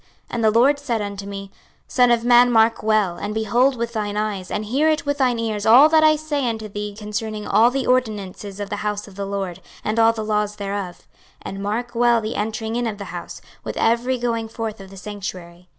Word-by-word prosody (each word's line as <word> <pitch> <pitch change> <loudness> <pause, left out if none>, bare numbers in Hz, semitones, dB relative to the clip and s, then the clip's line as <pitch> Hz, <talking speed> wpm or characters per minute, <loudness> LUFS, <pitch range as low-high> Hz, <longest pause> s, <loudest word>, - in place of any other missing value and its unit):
26:044:005 - - -33 0.2
And 235 -1 -2
the 220 - +5
LORD 285 +4 +4
said 240 -6 -2
unto 200 -1 -6
me, 195 -1 -7 0.4
Son 250 -1 +3
of 235 -1 +2
man, 245 0 +6
mark 225 0 +4
well, 210 -5 +1
and 210 +4 -4
behold 240 +5 +2
with 235 0 -3
thine 210 -2 -2
eyes, 205 -3 -2
and 210 - -3
hear 295 +8 +2
with 285 0 -1
thine 250 -3 +2
ears 220 -2 -2
all 260 +7 +8
that 315 0 +5
I 310 0 +6
say 295 -4 -1
unto 220 -1 -4
thee 205 0 -5
concerning 210 0 -4
all 220 +4 +5
the 270 +1 -2
ordinances 210 -5 -1
of 205 -1 -5
the 205 - -2
house 210 0 -3
of 200 - -14
the 200 0 -4
LORD, 190 -2 -4 0.2
and 215 +2 0
all 225 0 +6
the 220 -1 -5
laws 210 -1 0
thereof; 200 -3 -5 0.4
and 195 0 -6
mark 230 +4 -3
well 240 0 +3
the 220 0 -4
entering 220 +2 -3
in 240 0 0
of 210 -2 -4
the 200 - -7
house, 175 -1 -7 0.2
with - - -5
every 240 +3 +1
going 230 -2 -2
forth 220 -1 -5
of 190 - -11
the 195 - -12
sanctuary. 185 -3 -8
220 Hz, 225 wpm, -21 LUFS, 205-240 Hz, 0.4 s, all